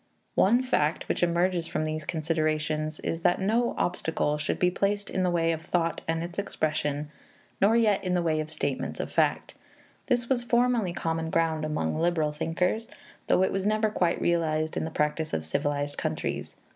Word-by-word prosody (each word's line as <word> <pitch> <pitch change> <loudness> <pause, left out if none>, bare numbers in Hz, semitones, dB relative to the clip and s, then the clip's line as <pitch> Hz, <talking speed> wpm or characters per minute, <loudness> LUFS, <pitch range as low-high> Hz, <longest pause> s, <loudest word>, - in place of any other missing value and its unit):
One 240 +6 +4
fact 155 -11 0
which - - -1
emerges 175 0 +1
from 155 - -1
these 155 -1 -3
considerations 155 -1 -1
is 165 - -2
that 175 +1 +3
no 230 +5 +1
obstacle 160 -4 0
should - - -1
be 180 0 +3
placed 200 +2 -1
in 185 - 0
the 180 - +2
way 165 -1 +2
of 160 -1 -3
thought 165 0 -1
and 165 0 0
its 175 +3 -5
expression, 150 -5 -2 0.5
nor 210 +4 +5
yet 215 -4 +3
in 180 -1 0
the 175 - +1
way 160 -2 +1
of 155 0 -3
statements 140 -4 -3
of - - -3
fact. - - +1 0.5
This 245 -2 +1
was 245 -2 +1
formerly 240 -5 +2
common 165 -1 -2
ground 160 -1 +1
among 150 - -1
liberal 165 -3 +1
thinkers, 180 +8 -1 0.4
though 185 - +4
it - - +1
was 195 +1 -1
never 215 0 +2
quite 175 -5 +1
realized 160 -2 +1
in - - -1
the - - -3
practice 155 0 -1
of 80 - -1
civilized 145 - -1
countries. - - -3
165 Hz, 185 wpm, -27 LUFS, 155-190 Hz, 0.5 s, nor